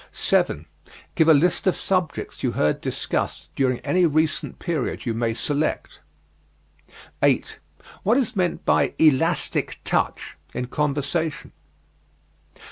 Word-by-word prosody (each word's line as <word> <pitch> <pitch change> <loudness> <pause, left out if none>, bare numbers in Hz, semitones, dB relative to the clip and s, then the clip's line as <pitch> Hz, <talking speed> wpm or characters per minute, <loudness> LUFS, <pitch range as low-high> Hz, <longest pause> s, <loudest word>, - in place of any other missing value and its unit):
7. 75 +2 +1 0.5
Give 160 - +3
a 160 - +8
list 170 +6 +2
of 185 - +3
subjects 185 -5 -2
you - - 0
heard 75 - +1
discussed - - -3
during 130 -2 +1
any 180 -1 +3
recent 155 +1 0
period 155 -7 -3
you 115 - 0
may 115 0 0
select. 145 +4 -2 1.2
8. - - +1 0.4
What 225 +6 +3
is 250 -3 0
meant 180 -3 -1
by - - +2
"elastic 150 -5 +2
touch" - - -1 0.2
in 125 - -2
conversation? 150 +2 -1
155 Hz, 120 wpm, -23 LUFS, 135-175 Hz, 1.2 s, a